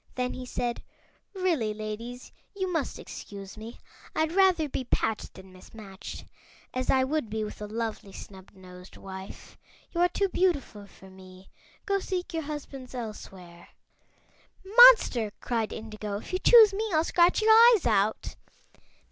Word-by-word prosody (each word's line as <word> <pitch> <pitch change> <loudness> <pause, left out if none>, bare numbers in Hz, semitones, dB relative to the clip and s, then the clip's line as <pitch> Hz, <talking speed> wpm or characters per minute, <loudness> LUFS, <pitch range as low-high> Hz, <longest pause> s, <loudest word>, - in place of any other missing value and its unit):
Then 250 -1 -2
he 255 -1 -8
said: 240 -1 -3 0.5
"Really, 320 - -1
ladies, 225 +4 -7 0.2
you 375 -2 -3
must 315 -5 -2
excuse 200 -1 -10
me. 225 +2 -10 0.4
I'd 315 0 0
rather 365 -4 +3
be 265 - -4
patched 225 -3 -2
than 190 0 -14
mismatched, 195 +1 -11 0.5
as 255 0 -3
I 260 -1 +4
would 275 -3 -2
be 220 +1 -3
with 210 0 -8
a 210 - -5
lovely 220 -2 -5
snubnosed 185 -2 -13
wife. 190 0 -11 0.3
You 340 - -2
are 355 - +4
too 395 - 0
beautiful 305 - -1
for 190 -1 -17
me; 185 0 -16 0.3
go 400 -1 0
seek 365 -2 -4
your 325 - -2
husbands 280 -4 -8
elsewhere." 190 -7 -9 1.0
"Monster!" 410 - +6
cried 230 -3 -2
Indigo; 215 -2 -6
"if 220 - -10
you 370 - 0
choose 440 -1 +7
me 435 +2 -2
I'll 315 -1 +2
scratch 350 +5 +2
your 440 - +5
eyes 455 -2 +7
out!" 215 -2 0
240 Hz, 145 wpm, -27 LUFS, 205-345 Hz, 1.0 s, choose